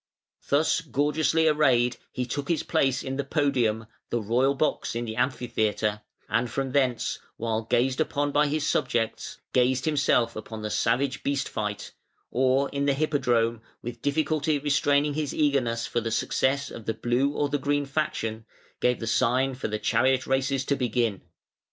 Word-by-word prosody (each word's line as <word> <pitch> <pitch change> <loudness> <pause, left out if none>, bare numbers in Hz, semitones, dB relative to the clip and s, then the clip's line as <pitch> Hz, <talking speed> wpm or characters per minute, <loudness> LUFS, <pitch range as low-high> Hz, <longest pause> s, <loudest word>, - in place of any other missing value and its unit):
Thus 155 +3 +3
gorgeously 155 +3 +1
arrayed 130 -6 +3
he 125 - -2
took 140 +3 -4
his 165 -3 +1
place 135 -1 +1
in 135 0 -4
the 140 - 0
podium, 130 -7 +1 0.2
the 120 - 0
royal 125 +6 +2
box 145 -4 -1
in 120 0 -2
the 110 -1 -5
Amphitheatre, 110 -4 0 0.3
and 120 +2 0
from 135 0 -2
thence, 130 -4 0 0.2
while 115 -1 -1
gazed 125 +3 +1
upon 145 0 0
by 150 +1 +3
his 150 +1 -1
subjects, 115 -5 -1 0.2
gazed 125 0 +2
himself 140 -6 +2
upon 110 0 -7
the 105 - -3
savage 130 +3 0
beast 140 -1 -1
fight, 105 -1 -4 0.4
or 130 +2 +2
in 140 0 -2
the 140 - +3
Hippodrome, 120 -6 +1 0.2
with 120 0 -6
difficulty 155 +1 +1
restraining 145 0 +2
his 150 -1 -2
eagerness 130 -6 +1
for 120 - -1
the 115 - -2
success 135 +5 0
of 115 - -9
the 110 - -1
Blue 120 +4 +1
or 145 -1 0
the 145 0 0
Green 145 +1 0
faction, 115 -6 -2 0.3
gave 125 -1 +1
the 115 - -4
sign 125 +4 +2
for 130 - -4
the 105 0 -2
chariot 130 +4 +2
races 135 0 0
to 140 - +1
begin. 120 -5 0
130 Hz, 165 wpm, -26 LUFS, 115-145 Hz, 0.4 s, Thus